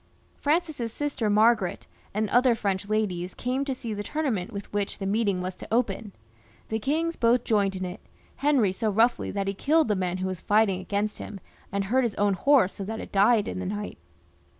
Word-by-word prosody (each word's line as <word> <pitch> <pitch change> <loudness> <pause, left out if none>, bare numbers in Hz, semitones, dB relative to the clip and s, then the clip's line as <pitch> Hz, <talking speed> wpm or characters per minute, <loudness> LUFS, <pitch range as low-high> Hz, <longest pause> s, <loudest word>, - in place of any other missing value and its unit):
Francis's 300 -6 0
sister 275 -5 -2
Margaret 215 -2 +3 0.3
and 215 +1 0
other 245 0 +5
French 200 -2 -2
ladies 185 -5 -1
came 255 +3 -1
to 270 -2 -2
see 230 -3 -5
the 205 - -4
tournament 240 - -2
with 200 -1 -7
which 205 -1 -1
the 195 - -5
meeting 200 -2 +1
was 185 +1 -3
to - - -9
open. 220 -3 0 0.6
The 220 - -1
kings 320 +7 0
both 235 0 +3
joined 200 -3 +1
in 185 0 -3
it, 180 +4 -6 0.4
Henry 275 -9 +3
so 215 +4 -1
roughly 225 +4 +2
that 195 -1 -2
he 195 - 0
killed 305 +7 +2
the 210 - +3
man 185 -1 -1
who 185 - -3
was 185 -2 -4
fighting 205 -3 +3
against 205 +3 -2
him, 200 - -7 0.3
and 200 0 0
hurt 255 +7 +2
his 230 -4 -1
own 205 -1 +2
horse 250 0 +4
so 200 - -6
that 220 +3 -4
it - - -8
died 205 +2 +4
in - - -4
the 190 - -4
night. 205 +1 -5
210 Hz, 205 wpm, -26 LUFS, 195-240 Hz, 0.6 s, other